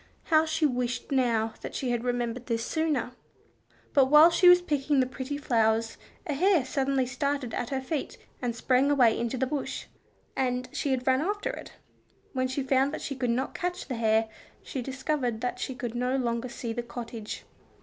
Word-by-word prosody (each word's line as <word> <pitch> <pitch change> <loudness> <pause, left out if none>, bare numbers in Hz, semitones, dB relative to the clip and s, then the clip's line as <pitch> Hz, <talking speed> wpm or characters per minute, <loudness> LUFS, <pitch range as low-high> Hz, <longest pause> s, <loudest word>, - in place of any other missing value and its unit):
How 315 +1 +5
she 315 0 +1
wished 250 -2 -1
now 230 -4 +1 0.2
she 255 -2 -2
had 240 -1 -1
remembered 245 0 -2
this 230 -1 -1
sooner! 310 -7 0 0.8
But 275 -2 +6
whilst 300 +5 +7
she 360 - +8
was 355 0 +8
picking 295 -4 0
the 260 - +4
pretty 260 +2 -5
flowers, 225 -5 +1 0.3
a 300 - -2
hare 345 -1 +3
suddenly 270 0 0
started 260 0 -2
at 245 - -2
her 270 -1 -2
feet 285 +3 -4 0.2
and 240 -2 -2
sprang 255 +3 +2
away 250 -6 +5
into 235 +2 -2
the 260 - +1
bush, 280 +1 -3 0.5
and 250 -1 0
she 285 - -1
had 255 -1 0
run 260 +1 +3
after 410 +5 -1
it. - - -9 0.6
When 255 -1 0
she 260 +2 -2
found 265 +1 +2
that - - -7
she 275 - -4
could 250 -2 -1
not 255 +3 0
catch 360 0 -3
the 255 - -3
hare, 220 -1 +2 0.4
she 265 - -4
discovered 260 -2 -2
that 250 - -2
she 260 - -3
could 245 -2 -4
no 250 +2 0
longer 240 -1 -1
see 235 -1 -5
the 240 - -2
cottage. 235 -2 -7
260 Hz, 190 wpm, -28 LUFS, 240-280 Hz, 0.8 s, she